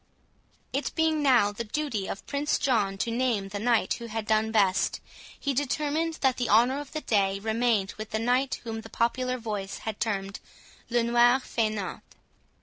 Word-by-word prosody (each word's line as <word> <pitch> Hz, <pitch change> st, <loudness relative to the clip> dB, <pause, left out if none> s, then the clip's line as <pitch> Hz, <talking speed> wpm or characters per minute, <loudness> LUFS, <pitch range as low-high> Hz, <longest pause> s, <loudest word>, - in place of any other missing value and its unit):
It 275 Hz, +2 st, -1 dB
being 320 Hz, -2 st, +2 dB
now 245 Hz, -8 st, +4 dB
the 205 Hz, +3 st, -5 dB
duty 230 Hz, -4 st, -2 dB
of 195 Hz, -, -6 dB
Prince 290 Hz, +1 st, 0 dB
John 210 Hz, -7 st, +1 dB
to 230 Hz, -, -1 dB
name 230 Hz, -5 st, 0 dB
the 205 Hz, +1 st, -4 dB
knight 235 Hz, +1 st, +2 dB
who 235 Hz, -, -6 dB
had 225 Hz, -1 st, -4 dB
done 220 Hz, 0 st, +2 dB
best, 195 Hz, -4 st, +2 dB, 0.4 s
he 280 Hz, -, -1 dB
determined 300 Hz, +4 st, -1 dB
that 265 Hz, -2 st, +2 dB
the 245 Hz, -2 st, -1 dB
honour 245 Hz, +6 st, +4 dB
of 290 Hz, -2 st, -9 dB
the 310 Hz, -, -3 dB
day 195 Hz, -5 st, +1 dB
remained 220 Hz, -2 st, +1 dB
with 215 Hz, 0 st, -5 dB
the 220 Hz, -, -1 dB
knight 250 Hz, +4 st, 0 dB
whom 225 Hz, -1 st, -5 dB
the 225 Hz, -, -12 dB
popular 255 Hz, +2 st, 0 dB
voice 210 Hz, -4 st, -4 dB
had 220 Hz, -2 st, -4 dB
termed 195 Hz, -3 st, -2 dB, 0.5 s
"Le 240 Hz, 0 st, +2 dB
Noir 240 Hz, +2 st, +4 dB
Faineant." 215 Hz, -6 st, -2 dB
230 Hz, 175 wpm, -27 LUFS, 215-260 Hz, 0.5 s, now